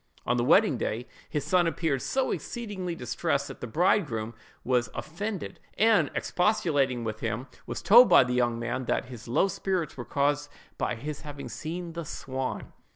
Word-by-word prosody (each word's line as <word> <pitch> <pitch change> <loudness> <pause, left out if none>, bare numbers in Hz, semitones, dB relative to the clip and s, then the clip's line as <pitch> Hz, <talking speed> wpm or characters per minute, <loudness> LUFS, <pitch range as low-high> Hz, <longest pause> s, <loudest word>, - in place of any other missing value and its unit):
On 120 - +2
the 120 - +1
wedding 150 - +4
day, 115 +2 -2 0.2
his 150 - -2
son 180 -2 +3
appeared 160 -5 0
so 265 -1 0
exceedingly 200 -7 -4
distressed, 125 +2 -1
that 135 - -10
the 125 - -4
bridegroom 120 - +1 0.3
was 125 -3 +1
offended, 200 +4 -5 0.2
and, 220 0 +4
expostulating 145 - +1
with 110 -1 -4
him, 115 +3 -2 0.2
was - - -5
told 230 +9 +8
by - - +8
the 125 0 -2
young 120 -1 +1
man 120 +2 -3
that - - 0
his 120 -3 -9
low 125 +11 +3
spirits 185 -4 -2
were 120 - -4
caused 145 +2 0 0.3
by - - 0
his 145 +6 -6
having 145 -2 -7
seen 170 +1 -5
the 170 0 -4
swan. 130 -3 -5
145 Hz, 170 wpm, -28 LUFS, 120-180 Hz, 0.3 s, told